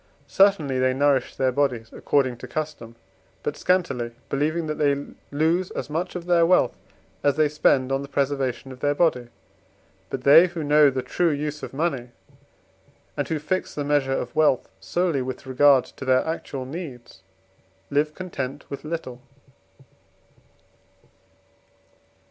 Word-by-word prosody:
Certainly 165 -10 +3
they 130 0 +2
nourish 140 -1 +2
their 130 -1 +1
bodies, 125 -5 -1
according 130 -4 0
to - - -9
custom, 150 -7 -5 0.5
but 145 - -2
scantily, 135 -11 0 0.2
believing 155 +4 0
that 155 0 -4
they 140 -1 +1 0.2
lose 165 +5 +1
as - - -6
much 175 +4 -3
of 175 -1 -5
their 175 -1 +4
wealth 180 +2 +3 0.5
as 145 -2 +3
they 155 0 +3
spend 140 -3 +2
on 135 0 0
the 140 - -7
preservation 135 -2 -2
of 130 - -11
their 145 +1 +1
body. 145 -8 +1 0.8
But 130 - -5
they 155 +6 +8
who 170 -2 -5
know 150 0 +5
the 130 -1 -3
true 170 +7 +1
use 150 0 -3
of - - -6
money, 135 -4 -2 1.1
and - - -2
who 160 - -1
fix 155 +5 -3
the 145 - -2
measure 145 -2 +1
of 120 - -5
wealth 150 -5 +3
solely 155 - 0
with 130 +2 -6
regard 130 0 +4
to - - -11
their 130 -1 +2
actual 140 -5 -4
needs, 135 - -8 0.7
live 150 +2 +1
content 145 -7 -5
with 140 - -6
little. 150 -6 -5
145 Hz, 150 wpm, -24 LUFS, 130-155 Hz, 1.1 s, they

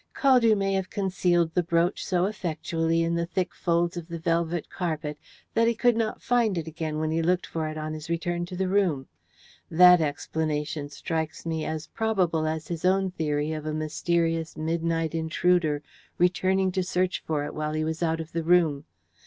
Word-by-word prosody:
Caldew 245 -6 +4
may 195 0 0
have 190 -1 -1
concealed 180 -4 +1
the 180 - +3
brooch 170 +1 +1
so 180 -1 +1
effectually 165 -4 -1
in 165 0 0
the 170 0 -1
thick 180 0 -2
folds 170 0 0
of 170 -2 -6
the 170 -1 -5
velvet 165 0 -1
carpet 155 -4 -3 0.3
that 230 0 +3
he 235 - +2
could 240 +1 +3
not 225 -1 -2
find 235 -6 +2
it 165 - -2
again 160 -1 -4
when 155 0 -1
he 165 +1 +1
looked 180 +2 +1
for 160 -1 -3
it 155 0 -5
on 155 0 -4
his 155 +1 -7
return 175 +1 -1
to 180 - -7
the 190 +1 0
room. 185 -9 +1 0.6
That 180 +1 +7
explanation 150 0 -2
strikes 160 +2 -4
me 160 -1 -2
as 155 0 -3
probable 180 -5 0
as 160 0 -3
his 170 -2 -5
own 190 +1 +2
theory 150 -3 -1
of 155 0 -5
a 155 - -2
mysterious 165 +1 -1
midnight 165 0 -1
intruder 160 -1 +1 0.3
returning 185 +1 +2
to 185 - 0
search 180 0 0
for 150 -2 0
it 145 - -6
while 155 0 -3
he 155 0 0
was 160 +1 -3
out 165 -1 +1
of 160 0 -6
the 165 - -1
room. 160 -4 +3
165 Hz, 190 wpm, -26 LUFS, 155-180 Hz, 0.6 s, That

